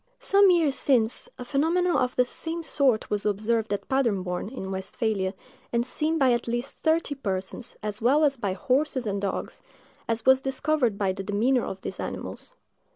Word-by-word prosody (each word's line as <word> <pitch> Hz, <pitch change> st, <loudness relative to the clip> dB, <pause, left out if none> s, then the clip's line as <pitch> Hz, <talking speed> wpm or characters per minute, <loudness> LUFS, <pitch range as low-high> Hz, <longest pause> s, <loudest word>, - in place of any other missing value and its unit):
Some 395 Hz, 0 st, +5 dB
years 330 Hz, -6 st, +3 dB
since, 240 Hz, -5 st, +1 dB
a 250 Hz, -, -7 dB
phenomenon 335 Hz, +7 st, +1 dB
of 250 Hz, 0 st, +1 dB
the 250 Hz, -, +3 dB
same 330 Hz, +6 st, -2 dB
sort 270 Hz, -8 st, +1 dB
was 205 Hz, -1 st, 0 dB
observed 220 Hz, +2 st, 0 dB
at 205 Hz, -, -3 dB
Paderborn, 200 Hz, -9 st, 0 dB
in 195 Hz, -7 st, -6 dB
Westphalia, 190 Hz, 0 st, -1 dB, 0.4 s
and 235 Hz, 0 st, +1 dB
seen 310 Hz, +5 st, 0 dB
by 265 Hz, -4 st, +4 dB
at 240 Hz, -, -2 dB
least 240 Hz, +3 st, -3 dB
thirty 320 Hz, -2 st, +1 dB
persons, 195 Hz, -3 st, -4 dB
as 210 Hz, 0 st, -2 dB
well 275 Hz, +7 st, +4 dB
as 285 Hz, -2 st, +3 dB
by 200 Hz, -6 st, -2 dB
horses 260 Hz, +5 st, 0 dB
and 200 Hz, -1 st, -2 dB
dogs, 200 Hz, -1 st, -4 dB, 0.5 s
as 230 Hz, 0 st, -1 dB
was 265 Hz, 0 st, +6 dB
discovered 270 Hz, -4 st, +1 dB
by 195 Hz, -2 st, 0 dB
the 195 Hz, -, -6 dB
demeanor 220 Hz, +6 st, +1 dB
of 190 Hz, -, -6 dB
these -, -, -6 dB
animals. -, -, -6 dB
245 Hz, 175 wpm, -26 LUFS, 205-280 Hz, 0.5 s, was